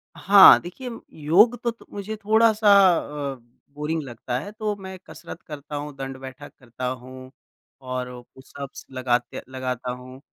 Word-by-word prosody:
हाँ, 195 +1 +8
देखिए, 245 +9 -8 0.3
योग 210 +11 +5
तो 235 - +1
तो 230 - -18
मुझे 205 +2 -5
थोड़ा-सा 220 0 +3 0.6
अ, - - -11 0.4
बोरिंग 155 +2 -2
लगता 120 -1 -5
है 205 - -8
तो 210 -1 -3
मैं 190 -1 -9
कसरत - - -10
करता 150 -1 -8
हूँ, 145 0 -5
दंड-बैठक 135 +1 -8
करता 125 -1 -7
हूँ, 130 +1 -7 0.5
और 130 -1 -4 0.3
पुशअप्स 135 +1 -10
लगाते 125 -2 -1
लगाता 130 -1 -4
हूँ, 130 +1 -10
140 Hz, 140 wpm, -24 LUFS, 130-200 Hz, 0.6 s, हाँ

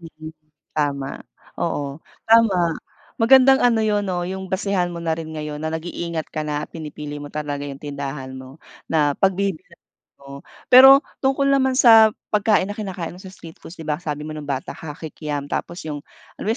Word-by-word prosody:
mm. 160 -1 -11 0.4
Tama, 140 -2 -2 0.4
oo 140 0 -3 0.3
tama. 195 -7 +4 0.5
Magandang 265 +3 +6
ano 230 -3 +3
'yon, 205 -1 0
oh, 175 -1 -1
yung 190 +1 -5
basehan 190 -2 0
mo - - -6
na 165 -1 0
rin 160 0 -5
ngayon 150 -1 -5
na 160 - -2
nag-iingat 165 0 -4
ka 155 - -3
na 150 0 -2
pinipili 150 -2 -8
mo 145 - -8
talaga 145 -1 -4
yung 140 - -7
tindahan 140 -2 -6
mo 130 +2 -10 0.3
na 150 -3 +2
pagbibilhan 190 -3 -1 0.4
mo. 140 0 -11 0.3
Pero 270 +2 +9 0.2
tungkol 275 +1 +2
naman 265 -1 +2
sa 225 -3 +7 0.2
pagkain 210 -2 +3
na 205 - -7
kinakain 190 -5 -5
mo 180 - -13
sa 190 - -10
street 165 -1 -13
foods 175 - -12
di 160 - -9
ba, 150 0 -2
sabi 150 -3 -4
mo 155 - -6
nung 150 -2 -8
bata 135 -1 -3
ka, 150 -2 -9
Kikiam, 150 -2 -6
tapos 170 -1 -4
yung, 150 -2 -5 0.4
ano - - -5
yun 225 - +1
160 Hz, 180 wpm, -21 LUFS, 150-200 Hz, 0.5 s, Pero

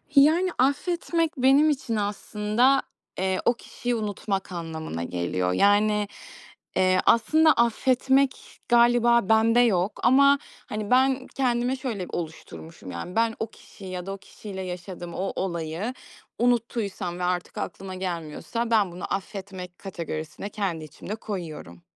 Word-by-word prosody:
Yani, 320 +6 +6
affetmek 330 +4 +1
benim 270 +4 +5
için 260 -6 -1
aslında, 210 +5 +1 0.4
eee, 190 0 0
o 235 - +5
kişiyi 245 +1 -4
unutmak 205 -3 -3
anlamına 160 - -5
geliyor. 90 +1 -1
Yani, 205 - +3 0.7
eee, 185 0 +3
aslında 310 +8 +5
affetmek 260 +3 +1
galiba 235 -2 +4
bende 225 +2 +5
yok. 205 -5 +2
Ama, 280 +2 +6 0.3
hani, 210 0 -4
ben 260 +1 +3
kendime 250 -1 0
şöyle 240 -8 -4
oluşturmuşum, 90 - -7
yani, 90 - -6
ben 225 0 +2
o 225 - -1
kişiyi 195 -3 -12
ya 180 -1 -5
da 195 - -4
o - - -6
kişiyle 195 0 -9
yaşadığım 180 -1 -6
o 195 +1 -2
olayı 170 +5 -3 0.5
unuttuysam 225 -7 0
ve - - -3
artık 180 0 -2
aklıma 190 -1 -5
gelmiyorsa 185 +6 -4
ben 210 -5 +3
bunu 180 +3 -5
affetmek 190 -2 -7
kategorisine 170 -1 -6
kendi 190 -6 -3
içimde 195 +6 -7
koyuyorum. 165 - -7
205 Hz, 130 wpm, -26 LUFS, 180-245 Hz, 0.7 s, Yani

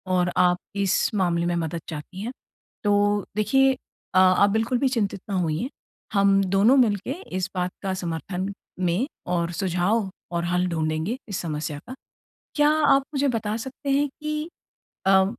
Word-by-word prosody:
और 180 -1 +2
आप 180 0 +4 0.2
इस 200 +1 +1
मामले 170 -3 +1
में 175 0 0
मदद 165 0 -2
चाहती 165 +5 -7
हैं। 235 +4 -3 0.5
तो 205 0 +2
देखिए 265 +6 +4 0.4
अ, - - +2
आप 185 +2 +6
बिल्कुल 225 +4 +1
भी 270 - +2
चिंतित 205 -6 -1
ना 195 - -1
होइए। 165 - -1 0.4
हम 195 0 +4
दोनों 195 +7 +4
मिलके 215 -1 +2 0.3
इस 190 +1 -1
बात 180 0 -1
का 190 -1 -1
समर्थन 180 +2 -3 0.3
में 185 +9 +1 0.3
और 170 0 0
सुझाव 190 +4 0 0.3
और 170 - 0
हल 180 +1 +1
ढूँढेंगे 160 +6 -1
इस 195 - -2
समस्या 150 -2 -3
का। 260 - -7 0.6
क्या 295 0 +5 0.2
आप 275 -1 +5
मुझे 280 +1 +2
बता 215 -1 -1
सकते 265 +4 -6
हैं 285 +1 +3
कि 305 +1 -3 0.6
अ, 190 0 +6
195 Hz, 160 wpm, -25 LUFS, 175-225 Hz, 0.6 s, आप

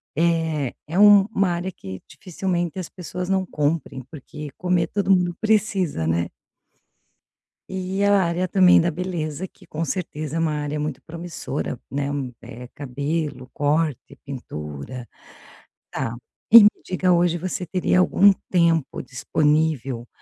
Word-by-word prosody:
Eh, 160 -4 +1
é 170 +4 -3
um 205 -1 +8
uma 195 -2 +2
área 175 +2 -2
que 95 - -9
dificilmente 180 -1 -3
as 180 - -5
pessoas 180 0 -6
não 190 -1 +1
comprem, 150 -4 -2
porque 150 0 -8
comer 180 -2 +1
todo 195 0 0
mundo 175 -2 +3
precisa, 205 - +1
né? 85 +1 0 1.4
E 190 +1 -3
a 205 - +4
área 175 +2 0
também 185 -1 +6
da 170 +1 +2
beleza, 170 -1 -3
que - - -17
com 160 +2 -3
certeza 155 -1 -3
é - - 0
uma 160 -2 +1
área 150 0 -3
muito 150 -3 -4
promissora, 170 0 -5
né. 140 0 -1 0.3
Eh, 125 +1 -10
cabelo, 140 -1 -3
corte, 145 -2 -1
pintura. 120 - -7 0.8
Tá, 115 +1 -3 0.4
e 230 -2 +12
me 210 - +8 0.2
diga: 185 0 +1
hoje 175 -1 +3
você 185 +1 -3
teria 180 +2 +1
algum 200 +2 +6 0.2
tempo 170 -4 +2
disponível 135 -2 0
165 Hz, 135 wpm, -23 LUFS, 145-180 Hz, 1.4 s, e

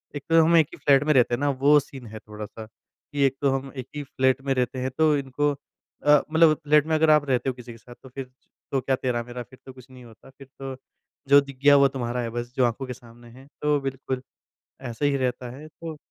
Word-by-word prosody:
एक 145 - -5
तो 165 0 +6
हम 170 +2 +3
एक 160 -3 +4
ही - - -9
फ्लैट 140 -1 +5
में 150 +1 +2
रहते 125 -3 +3
हैं 120 - 0
ना 145 +1 +1
वो 140 +2 +4
सीन 135 -3 -11
है 110 0 -9
थोड़ा-सा 105 +1 -9
कि 140 +5 -7
एक 135 -1 +1
तो 140 - +3
हम 135 0 -8
1 130 -2 -6
ही 145 - -4
फ्लैट 130 0 0
में 135 0 0
रहते 130 0 -1
हैं 130 +1 -2
तो 155 -1 +4
इनको 140 +2 -1 0.5
अ, 150 -1 +6
मतलब 160 -1 +5
फ्लैट 150 0 +4
में 160 - -1
अगर 155 0 +3
आप 150 -1 +5
रहते 130 0 +1
हो - - -2
किसी 125 -1 -11
के 115 - -12
साथ 120 +2 -15
तो 130 - -12
फ़िर 130 0 -8 0.4
तो 135 - 0
क्या 130 +1 0
तेरा-मेरा 125 -1 -3
फ़िर 130 +2 -19
तो 130 - -10
कुछ 130 -1 -15
नहीं 130 -1 -14
होता। 115 0 -16
फ़िर 135 0 -16
तो 135 -1 -6 0.5
जो 140 +1 +8
दिख 140 -2 -11
गया 145 0 +7
वो 140 0 +6
तुम्हारा 125 -2 -3
है 115 - -3
बस 120 +1 -6
जो 130 - +4
आँखों 120 +3 -2
के 125 - -5
सामने 120 -1 -16
है 135 - -15 0.2
तो 150 -1 +2
बिल्कुल। 135 -1 -4 0.7
ऐसे 120 +5 -2
ही 140 - 0
रहता 125 -1 -2
है 150 +3 -11
तो। 160 0 -9
135 Hz, 255 wpm, -25 LUFS, 125-145 Hz, 0.7 s, जो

